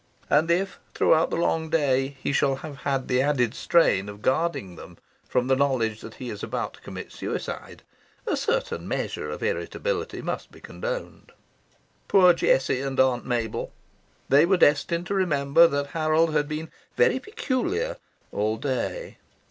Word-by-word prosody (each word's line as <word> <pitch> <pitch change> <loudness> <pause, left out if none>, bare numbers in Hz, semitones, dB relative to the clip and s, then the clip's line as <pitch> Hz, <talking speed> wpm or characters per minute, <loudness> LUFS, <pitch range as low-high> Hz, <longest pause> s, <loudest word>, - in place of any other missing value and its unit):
And 155 +3 +4
if 185 +2 0 0.2
throughout 160 +1 +4
the - - -2
long 160 -1 0
day 135 -3 +1
he - - 0
shall 140 -1 +2
have 145 -3 -8
had 135 -2 -2
the 125 0 +2
added 130 -5 +1
strain 105 - +2
of 105 +1 -11
guarding 130 - 0
them - - -12 0.3
from 125 - +1
the 130 +1 +3
knowledge 125 -6 0
that 110 - -10
he 125 -3 -6
is 105 -1 -7
about - - -3
to - - -17
commit - - -8
suicide, - - -5 0.4
a - - 0
certain 475 +1 -1
measure - - -3
of - - -6
irritability 475 -2 -2
must - - -4
be - - -15
condoned. - - -6 0.7
Poor 180 -3 +6
Jessie 130 -5 +2
and 135 -1 -3
Aunt 130 -2 +2
Mabel! 115 -3 -2 0.5
They 140 +3 +6
were 185 +2 +3
destined 170 +2 +3
to 200 - -3
remember 165 -4 +4
that 140 -2 -2
Harold 160 0 +2
had 150 -1 +1
been 155 +1 -5 0.2
"very 480 - +3
peculiar" 420 - -2 0.3
all 110 +2 -1
day. 145 - -3
145 Hz, 160 wpm, -25 LUFS, 130-175 Hz, 0.7 s, Poor